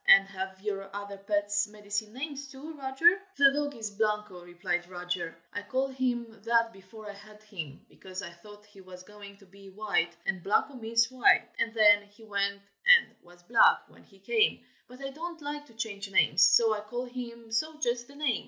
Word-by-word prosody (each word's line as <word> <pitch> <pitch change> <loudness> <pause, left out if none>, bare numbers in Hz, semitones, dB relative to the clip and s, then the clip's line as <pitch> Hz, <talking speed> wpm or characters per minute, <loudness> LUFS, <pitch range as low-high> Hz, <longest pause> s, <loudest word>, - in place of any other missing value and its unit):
And 195 0 +8
have 190 0 -6
your 195 -2 -3
other 200 0 -6
pets, 205 +1 0
medicine 210 0 -4
names, 280 +1 -5
too, 275 +4 -9
Roger?" 300 +8 +3 0.2
"The 275 -1 +6
dog 290 0 -2
is 220 -3 -5
Blanco," 210 -3 -2
replied 175 0 -3
Roger. 180 -2 -4 0.2
"I 205 - -3
called 260 +6 -2
him 240 -4 -2
that 230 0 +2
before 195 +3 -13
I 205 - -6
had 210 +1 -15
him, 165 -10 -8
because 190 +1 -9
I - - -7
thought 205 +4 -15
he 205 -2 -16
was 185 -1 -12
going 200 0 -13
to 200 - -19
be 195 +1 -15
white, 190 -4 -1
and 190 -2 -1
Blanco 205 +9 +1
means 230 -1 +1
white. 255 -1 +4
And 230 - +1
then 205 -2 +7
he 205 +2 -19
went 200 -1 -2 0.2
and 485 -1 +7
was 175 0 -19
black 230 +6 +4
when - - -19
he - - -22
came, 455 -2 +1 0.2
but 250 +2 -14
I 270 - -4
don't 335 +4 -7
like 295 0 -6
to 230 - -19
change 210 -3 -5
names, 185 -2 +4
so 230 -1 +6
I 210 - -3
called 240 +4 -5
him 235 -2 -8
so 310 +8 -1
just 240 -4 -1
the 280 - -16
same. 270 -7 +1
210 Hz, 200 wpm, -29 LUFS, 195-250 Hz, 0.2 s, And